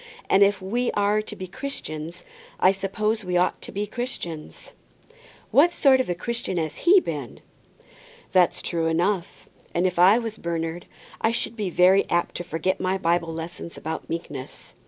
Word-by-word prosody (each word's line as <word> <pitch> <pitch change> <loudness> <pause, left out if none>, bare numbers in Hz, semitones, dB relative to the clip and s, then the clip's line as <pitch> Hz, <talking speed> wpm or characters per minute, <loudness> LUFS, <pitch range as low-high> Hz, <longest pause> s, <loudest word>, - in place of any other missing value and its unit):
And 195 - +5
if 200 -1 +5
we 240 +6 0
are 205 +1 +2
to 210 0 -7
be 185 - -6
Christians, 170 - -6 0.3
I 185 - +6
suppose 210 +3 -1
we 180 -1 0
ought 180 +1 +1
to - - -6
be 205 +1 -2
Christians." 200 -9 -6 0.8
"What 340 +5 +5
sort 270 -5 +5
of 255 - -5
a 175 - 0
Christian 230 0 -3
has 160 -2 -2
he 375 +3 +6
been?" 145 - -5 0.9
"That's 180 -2 +3
true 165 -2 -1
enough; 175 +3 -1 0.3
and 175 +2 +2
if 180 -1 0
I 190 +5 +7
was 225 -2 -4
Bernard, 170 0 -3 0.3
I 225 - +3
should 235 0 -3
be 210 -4 -2
very 185 +3 +4
apt 175 0 +1
to 175 - -4
forget 175 +2 -1
my 185 +1 0
Bible 170 -2 +1
lessons 165 +1 -7
about 160 +1 -5
meekness." 145 -5 -6
185 Hz, 170 wpm, -24 LUFS, 170-215 Hz, 0.9 s, I